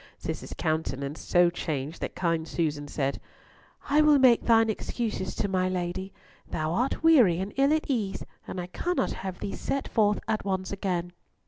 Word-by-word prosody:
Cis's - - -5
countenance 145 -2 -2
so 175 -1 +4
changed 155 -2 -4
that - - -4
kind 165 -2 0
Susan 150 -3 -2
said, 140 -1 -2 0.7
"I 295 +2 +4
will 300 -1 +6
make 255 -3 +6
thine 225 -1 +5
excuses 220 -2 -3
to 205 - 0
my 185 -1 +1
Lady. 185 +1 -3 0.4
Thou 155 +1 -2
art 250 - 0
weary 255 - +6
and 195 +2 -4
ill 275 +2 +3
at 310 0 +2
ease, 215 -8 -2 0.2
and 185 - -5
I 175 - -3
cannot 345 - -1
have 190 -2 -5
thee 200 - -4
set 275 - -2
forth 210 -2 +2
at 220 - 0
once 190 -1 -2
again." 180 -3 -2
190 Hz, 175 wpm, -27 LUFS, 170-230 Hz, 0.7 s, will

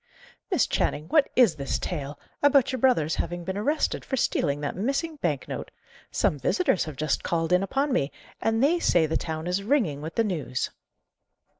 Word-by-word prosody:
"Miss - - +3
Channing, 150 +2 -1
what 300 -3 +4
is 225 -11 +5
this 140 -1 -2
tale, 145 -4 -4 0.2
about 280 -3 +4
your 260 - -3
brother's 190 - +2
having 175 0 -3
been 190 +2 -4
arrested 290 +10 0
for 265 - -3
stealing 145 - +1
that 145 - -3
missing 275 - -1
bank 150 - -2
note? - - -5 0.4
Some 145 - 0
visitors 280 - +1
have 155 -3 -7
just 155 +2 0
called 165 0 0
in 180 - +4
upon 270 +7 0
me, 140 -8 +1 0.3
and 225 +2 +1
they 335 +5 +3
say 170 - +3
the 155 - -2
town 160 0 -3
is 180 +2 0
ringing 200 - +1
with 160 +2 -6
the 230 - +3
news." 155 - -2
180 Hz, 185 wpm, -26 LUFS, -, 0.4 s, is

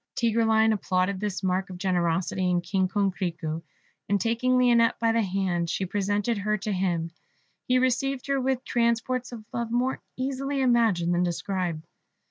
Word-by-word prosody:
Tigreline 225 -1 +3
applauded 185 -1 0
this 205 -1 -3
mark 190 +1 0
of 185 - -7
generosity 180 0 0
in 175 -1 +2
King 185 +2 0
Coquerico; 180 -5 -2 0.5
and 200 0 +2
taking 235 +4 +1
Lionette 235 -2 +4
by 230 -1 +2
the 230 0 +2
hand, 185 -4 -1
she 190 - -1
presented 205 +3 -1
her 210 +1 0
to 210 +2 -4
him. 175 -4 -1 0.6
He 255 - +3
received 260 +1 0
her 275 -1 0
with 260 0 -1
transports 240 +2 0
of 225 -3 -9
love 235 -1 -2
more 245 +3 0 0.2
easily 275 +2 -2
imagined 225 -9 +3
than 175 - +1
described. 175 -2 -2
205 Hz, 155 wpm, -26 LUFS, 185-240 Hz, 0.6 s, Lionette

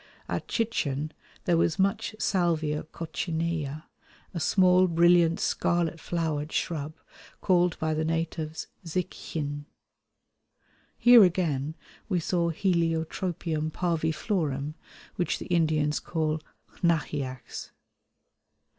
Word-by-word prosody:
At - - -3
Chichen 155 - -1 0.3
there 175 -2 +3
was 165 -1 +2
much 195 +2 0
Salvia 165 -7 +1
coccinea, 160 -2 -3 0.5
a 170 - -3
small 185 +2 +4
brilliant 170 0 +4
scarlet 170 -1 0
flowered 160 -3 -2
shrub 155 -2 -2 0.4
called 180 -2 +2
by 160 0 0
the 155 +1 0
natives 160 -1 -2 0.2
zic 180 +2 -2
x̆in. 145 -2 -5 1.3
Here 240 -2 +8
again 160 -5 +1 0.3
we 185 -3 +2
saw 170 0 0
Heliotropium 165 -2 0
parviflorum, 160 -3 -1 0.4
which 175 - 0
the - - -7
Indians 155 -3 +2
call 155 -2 -1 0.4
xnaheax. 145 -6 -2
165 Hz, 95 wpm, -28 LUFS, 155-175 Hz, 1.3 s, Here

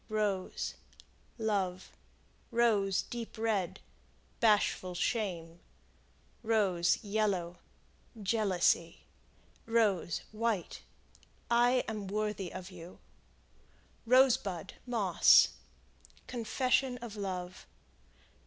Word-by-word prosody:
Rose 210 -3 -2 0.6
Love. 195 -5 -2 0.6
Rose, 215 -5 +2
Deep 235 -1 -7
Red 220 -5 -1 0.6
Bashful 205 -4 +2
shame. 175 -5 -2 0.8
Rose, 195 -7 +2
Yellow 200 -5 -1 0.6
Jealousy. 190 -5 +1 0.7
Rose, 210 -7 +1
White 215 -4 -2 0.7
I 245 +2 +4
am 215 -3 -4
worthy 210 -2 -2
of 185 +1 -8
you. 175 0 -11 1.1
Rosebud, 250 -9 +3
Moss 215 -7 +5 0.8
Confession 250 +2 0
of 235 -3 -8
love. 185 -3 -5
205 Hz, 70 wpm, -32 LUFS, 185-230 Hz, 1.1 s, Moss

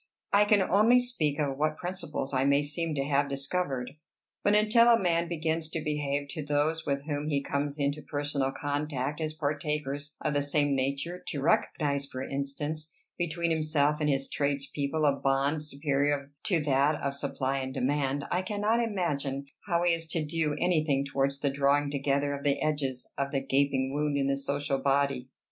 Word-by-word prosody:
I 205 +1 +6
can 205 -2 +4
only 215 +7 +5
speak 205 - -1
of 140 -2 -1
what 155 0 +1
principles 175 -6 -4
I 130 0 +2
may 140 +1 +3
seem 155 +2 -2
to 135 - 0
have 140 0 +1
discovered. 135 -2 -2 0.5
But 205 - +4
until 215 +3 +5
a 235 - +7
man 170 -3 +1
begins 160 -1 -1
to 160 - -3
behave 145 -2 -1
to 155 - -4
those 150 +3 0
with 140 0 0
whom 145 -1 -2
he 140 -2 0
comes 140 +1 -2
into 145 +1 -1
personal 145 -2 -1
contact 145 0 -2
as 155 0 -2
partakers 150 -1 -2
of 150 - -1
the 145 - +2
same 145 0 +2
nature, 140 +7 -2
to 140 - -3
recognize, 140 -2 +1
for 130 -1 -5
instance, 145 +3 -4 0.3
between 170 0 0
himself 155 -1 +2
and 150 - +2
his 135 -1 0
trades 140 -1 -1
people 150 +2 -1
a 140 -1 +4
bond 140 +3 +1
superior 145 -1 -1
to 180 -5 +2
that 145 +1 +3
of 140 0 -2
supply 135 -1 -2
and 130 0 -5
demand, 140 +1 0
I 180 - +2
cannot 210 +4 0
imagine 145 -10 -2 0.2
how 170 -2 +2
he 175 -1 +4
is 165 -1 -2
to 160 -3 0
do 155 -1 0
any 175 -3 +2
thing 140 -3 +1
towards 140 0 -1
the 140 - +1
drawing 140 +1 +2
together 140 0 0
of 140 0 -5
the 140 -1 +2
edges 140 -4 -1
of 140 0 0
the 140 -1 0
gaping 135 0 +1
wound 145 0 0
in 140 - +1
the 135 0 +1
social 140 0 -1
body." 135 -2 +1
145 Hz, 185 wpm, -29 LUFS, 140-155 Hz, 0.5 s, a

